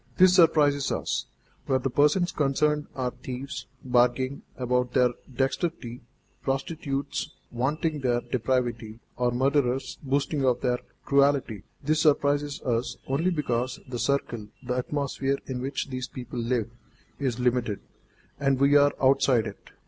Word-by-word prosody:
This 185 -1 +7
surprises 150 -5 +4
us, - - -2 0.4
where 130 - +3
the 130 0 -2
persons 150 +7 +3
concerned 150 +1 +1
are 125 -2 -1
thieves, 130 +2 -7 0.2
bragging 125 +2 +2 0.2
about 125 -1 0
their 125 -1 +4 0.2
dexterity, 130 -1 -2 0.4
prostitutes 140 +1 -3 0.2
vaunting 150 +5 -1
their 120 -2 +1
depravity, 120 -3 -1 0.2
or 125 0 +1
murderers 130 +1 0
boasting 140 +1 0
of 125 -2 +2
their 125 0 +1 0.3
cruelty. 140 -7 +2 0.2
This 155 +2 +2
surprises 145 -1 +2
us 120 0 -1
only 145 +7 +1
because 130 -6 -1
the 125 -2 -5
circle, 120 -6 -1 0.2
the 125 0 -2
atmosphere 140 +1 -1
in 125 -2 -4
which 135 +1 -3
these 130 0 -3
people 125 -1 -7
live, 115 -1 -1 0.5
is 130 -4 -1
limited, 125 -4 +1 0.6
and 135 -2 +2
we 140 +1 +5
are 145 0 +6
outside 130 -3 +4
it. 100 - -9
130 Hz, 135 wpm, -27 LUFS, 125-145 Hz, 0.6 s, This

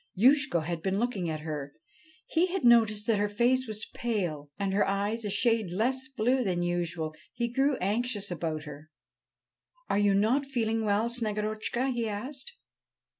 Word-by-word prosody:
Youshko 265 - +4
had 165 +1 -3
been 190 +2 0
looking 205 -7 -1
at 155 -1 -3
her; 150 -3 -5 0.5
he 335 +3 +2
had 370 -5 -2
noticed 220 -3 +5
that 220 -3 +2
her 205 0 +1
face 245 +4 +2
was 215 -1 -3
pale 175 -11 -2
and 195 -1 -1
her 205 - +3
eyes 205 +3 -1
a 210 - -2
shade 225 -1 +2
less 255 +7 0
blue 260 0 +1
than 180 -4 0
usual. 175 -2 -2 0.2
He 235 - -1
grew 275 +2 +2
anxious 205 0 -1
about 160 -3 -3
her. 150 0 -10 1.0
'Are 200 - +2
you 205 -1 +3
not 240 +8 +2
feeling 225 -4 0
well, 210 +2 +2
Snegorotchka?' 220 +2 -1
he 235 -2 -1
asked. 260 - -5
215 Hz, 165 wpm, -29 LUFS, 185-240 Hz, 1.0 s, noticed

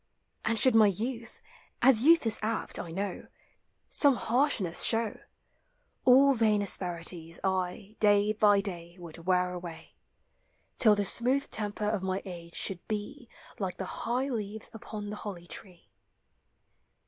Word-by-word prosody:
And 230 +1 +1
should 255 +3 +6
my 220 -2 +6
youth 230 +4 -4 0.2
— - - -33
as 250 -3 +6
youth 330 +1 +5
is 225 - +2
apt, 220 +1 -3
I 170 - -6
know 190 +3 -5 0.3
— - - -48 0.3
Some 285 -3 +5
harshness 235 - +1
show, 225 -2 +2 0.9
All 270 +2 +6
vain 215 -4 +2
asperities 170 -3 -2
I, 190 +3 -3
day 205 0 +3
by 205 -1 +3
day, 175 -3 -6
Would 170 -1 -11
wear 180 -1 +1
away, 175 -2 -9 0.9
Till 215 -4 +6
the 205 0 -1
smooth 260 +8 0
temper 210 0 -3
of 210 -2 -1
my 190 0 -3
age 170 -2 -9
should 190 -3 +1
be 225 +5 -6 0.3
Like 190 -3 -4
the 190 - -4 0.2
high 250 +3 -1
leaves 220 -3 -5
upon 210 -2 -8
the 210 - -6
holly 185 -5 -8
tree. 175 - -7
205 Hz, 150 wpm, -29 LUFS, 180-230 Hz, 0.9 s, should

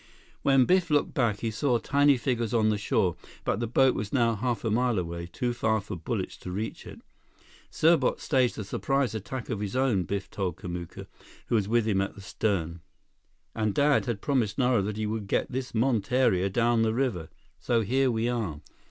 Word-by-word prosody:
When 135 -2 +4
Biff 185 +2 +2
looked 145 -1 +1
back, 120 -8 0
he 115 - -1
saw 120 +3 +1
tiny 140 +3 +3
figures 120 -3 -1
on 110 -1 +3
the 105 - +1
shore, 90 -4 +1 0.3
but - - -1
the 120 - -1
boat 130 +3 +4
was 105 -1 -4
now 120 -4 +2
half 115 +1 -2
a 110 - +1
mile 120 0 +1
away, 85 -1 -4
too 120 +8 -2
far 110 -2 +1
for 100 -2 -7
bullets 85 - -4
to 90 - -8
reach 105 +5 -5
it. - - -11 0.7
"Serbot 165 +1 +3
staged 130 -4 +1
a 110 - -3
surprise 135 +5 -1
attack 110 +5 -5
of 110 - -2
his 105 +2 -4
own," 125 -9 +2
Biff 100 +2 -3
told 95 -3 -2
Kamuka, 90 -3 -7 0.4
who - - -1
was 105 -4 +2
with 115 0 +2
him 95 -3 +2
in 95 - -2
the 100 - -11
stem. 85 -5 -2 0.7
"And 110 -2 -1
Dad 145 -1 +3
had 115 -4 -2
promised 120 -8 0
Nara 125 -4 +3
that 105 +2 -3
he 110 - -1
would 105 -1 -3
get - - 0
this 130 0 -4
monteria 115 -4 +2
down 120 +2 +2
the 110 0 +1
river. 105 -12 -1 0.3
So 115 -1 +1
here 130 +5 +2
we 115 -1 0
are!" 110 -12 -2
115 Hz, 200 wpm, -27 LUFS, 100-125 Hz, 0.7 s, When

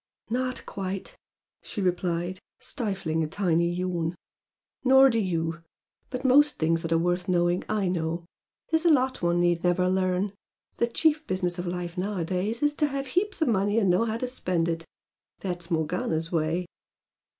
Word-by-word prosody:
"Not 255 +1 -1
quite!" 195 -1 -5 0.5
she - - -7
replied, 180 -1 -1 0.2
stifling 195 - -2
a - - -1
tiny 170 -1 +1
yawn 175 -1 -1 0.7
"Nor 265 +1 +7
do 230 - +1
you! 165 -4 -1 0.5
But 255 +1 -5
most 290 +3 +5
things 165 +1 +1
that 165 - -4
are 165 - +4
worth 175 +2 0
knowing 175 0 +2
I 210 -3 +1
know. 170 -1 -2 0.5
There's 320 0 +2
a - - +6
lot 260 -4 +2
one 175 0 +2
need 175 -1 +2
never 180 +1 +2
learn. 185 +1 +1 0.4
The 235 - +2
chief 310 +5 +1
business 180 -1 -1
of 175 - -3
life 175 0 -4
nowadays 195 - -1
is 295 0 +3
to 300 - +3
have 275 -1 -3
heaps 385 -2 +1
of 305 - +1
money 205 0 +2
and 200 -5 +4
know 185 +6 +3
how 225 0 -1
to 255 - -2
spend 180 -9 -1
it. 165 -1 -2 0.6
That's 175 -2 -4
Morgana's 165 0 -1
way." 165 +2 0
185 Hz, 165 wpm, -27 LUFS, 170-230 Hz, 0.7 s, Nor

